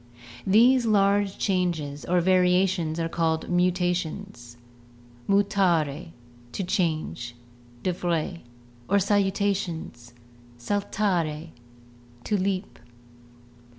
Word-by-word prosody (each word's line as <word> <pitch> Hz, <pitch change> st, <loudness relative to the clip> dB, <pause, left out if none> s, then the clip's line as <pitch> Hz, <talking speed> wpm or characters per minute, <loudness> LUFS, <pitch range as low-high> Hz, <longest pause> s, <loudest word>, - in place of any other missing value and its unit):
These 235 Hz, +5 st, +5 dB
large 200 Hz, -1 st, +2 dB
changes 170 Hz, -7 st, -1 dB
or 180 Hz, 0 st, +2 dB
variations 180 Hz, -2 st, +2 dB
are 165 Hz, -, 0 dB
called 165 Hz, -1 st, -1 dB
muta 180 Hz, 0 st, +2 dB
tions 160 Hz, -9 st, -6 dB, 0.7 s
(Lat. -, -, -15 dB, 0.2 s
mutare, 170 Hz, -8 st, +1 dB, 0.5 s
to 195 Hz, -, -2 dB
change) 155 Hz, -9 st, -2 dB, 0.5 s
(De 185 Hz, -, 0 dB
Vries) 170 Hz, -1 st, -2 dB, 0.5 s
or 200 Hz, -, +4 dB
saltations 195 Hz, -, -1 dB, 0.6 s
(Lat. 205 Hz, 0 st, 0 dB
saltare, 170 Hz, -6 st, -1 dB, 0.7 s
to 210 Hz, -, -1 dB
leap). 190 Hz, 0 st, -2 dB
180 Hz, 90 wpm, -26 LUFS, 165-200 Hz, 0.7 s, These